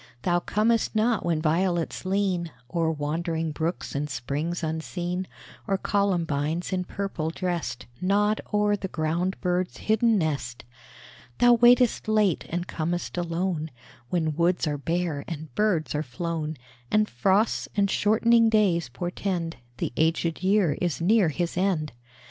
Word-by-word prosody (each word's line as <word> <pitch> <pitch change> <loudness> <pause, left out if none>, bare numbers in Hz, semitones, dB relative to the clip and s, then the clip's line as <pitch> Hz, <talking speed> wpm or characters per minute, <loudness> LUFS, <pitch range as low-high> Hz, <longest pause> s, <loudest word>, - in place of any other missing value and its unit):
Thou 175 +3 +2
comest 220 +5 +1
not 220 0 +2
when 165 -2 0
violets 170 +2 0
lean 190 -3 0 0.2
O'er 165 -2 +1
wandering 160 +2 -2
brooks 165 +3 -3
and 145 +1 -2
springs 145 +7 -3
unseen, 175 +3 -3 0.4
Or 195 -2 +1
columbines, 175 -5 0
in 180 -1 -1
purple 185 -5 -3
dressed, 170 -7 -3 0.2
Nod 205 +3 +2
o'er 210 0 +3
the 195 -1 -4
ground 170 +3 -1
bird's 180 0 -1
hidden 220 +1 +2
nest. 140 -8 -2 0.7
Thou 245 0 +6
waitest 240 0 +5
late 210 -5 +2
and 175 +1 -2
com'st 170 +2 -3
alone, 170 -2 -2 0.4
When 160 -2 0
woods 175 +2 +2
are 145 -2 -2
bare 165 -2 -1
and 155 -4 -7
birds 195 - +1
are 150 - 0
flown, 155 +3 -4 0.3
And 215 0 +3
frosts 195 - +1
and 200 -1 +4
shortening 230 +2 +4
days 185 - +2
portend 175 +4 -3 0.2
The 120 - -3
aged 165 +1 +1
year 190 -5 +2
is 175 -4 0
near 190 +1 +4
his 170 +3 -2
end. 175 -5 0
175 Hz, 135 wpm, -26 LUFS, 160-200 Hz, 0.7 s, Thou